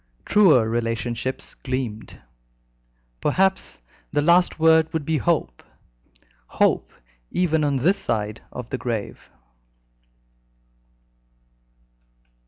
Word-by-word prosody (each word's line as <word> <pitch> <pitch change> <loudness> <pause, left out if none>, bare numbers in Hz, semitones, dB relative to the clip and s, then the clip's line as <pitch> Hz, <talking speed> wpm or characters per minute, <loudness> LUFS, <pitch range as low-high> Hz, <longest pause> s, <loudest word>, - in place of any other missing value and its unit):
Truer 170 - +5
relationships 120 +2 -3
gleamed. 130 -5 -5 1.0
Perhaps 190 - 0 0.3
the 145 - +1
last 175 +3 +3
word 160 0 +4
would 160 -3 -2
be 160 -1 0
hope 155 - -1 0.9
hope - - +1 0.4
even 160 -4 +1
on 145 -1 +1
this 170 +10 +2
side 105 -1 -3
of 125 -2 -7
the 130 - -3
grave. 115 -4 -5
140 Hz, 85 wpm, -23 LUFS, 115-160 Hz, 1.0 s, Truer